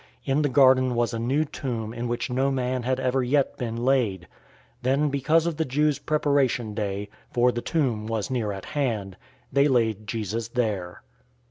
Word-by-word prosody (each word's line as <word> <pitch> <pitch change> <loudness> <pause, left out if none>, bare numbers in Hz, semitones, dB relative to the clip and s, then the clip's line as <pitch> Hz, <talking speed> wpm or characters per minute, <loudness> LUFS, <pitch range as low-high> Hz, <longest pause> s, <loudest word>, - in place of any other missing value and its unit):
In 140 +2 +2
the 145 - +1
garden 130 -1 +5
was 120 0 0
a 115 - -2
new 135 +7 +1
tomb 115 -6 -4
in 120 +1 -4
which 120 +1 -2
no 135 +2 +1
man 130 -1 -1
had 130 +2 -1
ever 130 0 +1
yet 135 +2 +1
been 115 -2 -3
laid. 120 -7 +1
019:042 - - -17 0.5
Then 135 +4 +2
because 145 +4 +2
of 170 -3 -2
the 160 - 0
Jews' 150 +2 +1
Preparation 140 -7 +1
Day 100 -1 -3 0.2
(for 125 +1 +3
the 120 - -3
tomb 120 -10 -1
was 110 +2 -2
near 115 -5 -1
at 95 -1 -7
hand) 110 -10 -2 0.4
they 140 +1 +4
laid 110 -5 +1
Jesus 110 0 -3
there. 105 -7 -2
125 Hz, 185 wpm, -25 LUFS, 115-135 Hz, 0.5 s, garden